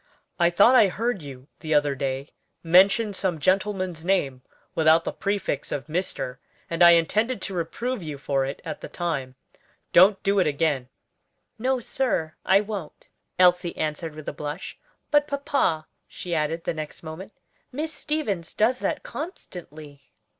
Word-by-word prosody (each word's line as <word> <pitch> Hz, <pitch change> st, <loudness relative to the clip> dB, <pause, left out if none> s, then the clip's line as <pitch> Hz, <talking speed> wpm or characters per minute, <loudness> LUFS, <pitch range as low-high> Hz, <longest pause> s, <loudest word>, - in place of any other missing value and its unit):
I 170 Hz, 0 st, +5 dB
thought 205 Hz, +8 st, +5 dB
I 235 Hz, -5 st, +7 dB
heard 220 Hz, +2 st, -2 dB
you 135 Hz, -2 st, -10 dB
the 155 Hz, -1 st, -1 dB
other 145 Hz, -1 st, +3 dB
day 135 Hz, +1 st, -3 dB, 0.3 s
mention 195 Hz, +6 st, +5 dB
some 185 Hz, -3 st, -1 dB
gentleman's 185 Hz, 0 st, 0 dB
name 150 Hz, -9 st, 0 dB, 0.3 s
without 160 Hz, +1 st, +4 dB
the -, -, -3 dB
prefix 200 Hz, -8 st, -2 dB
of 135 Hz, -, -3 dB
Mr., 150 Hz, -6 st, -3 dB, 0.3 s
and 165 Hz, +1 st, -2 dB
I 170 Hz, 0 st, +9 dB
intended 215 Hz, +8 st, +2 dB
to 195 Hz, -, -4 dB
reprove 205 Hz, +8 st, -3 dB
you 155 Hz, -4 st, -6 dB
for 135 Hz, -1 st, 0 dB
it 135 Hz, +1 st, -5 dB
at 155 Hz, -, -5 dB
the -, -, -6 dB
time. 140 Hz, -7 st, -3 dB, 0.6 s
Don't 195 Hz, +3 st, +6 dB
do 200 Hz, 0 st, +2 dB
it 185 Hz, -, +3 dB
again." 145 Hz, -4 st, 0 dB, 0.7 s
"No, 260 Hz, +2 st, +1 dB
sir, 225 Hz, -10 st, -1 dB
I 195 Hz, +1 st, +5 dB
won't," 205 Hz, -7 st, -7 dB, 0.3 s
Elsie 180 Hz, -1 st, +3 dB
answered 155 Hz, 0 st, -3 dB
with 155 Hz, -1 st, -10 dB
a -, -, -3 dB
blush. 150 Hz, +4 st, -6 dB, 0.4 s
"But, 290 Hz, 0 st, +4 dB
papa," 275 Hz, -, 0 dB, 0.2 s
she 175 Hz, -, -6 dB
added 160 Hz, +1 st, -1 dB
the -, -, -1 dB
next 155 Hz, 0 st, -7 dB
moment, 165 Hz, +6 st, -8 dB, 0.4 s
"Miss 310 Hz, +4 st, -4 dB
Stevens 210 Hz, -, -3 dB
does 240 Hz, +4 st, +2 dB
that -, -, -2 dB
constantly." 160 Hz, -, -9 dB
170 Hz, 155 wpm, -25 LUFS, 150-205 Hz, 0.7 s, I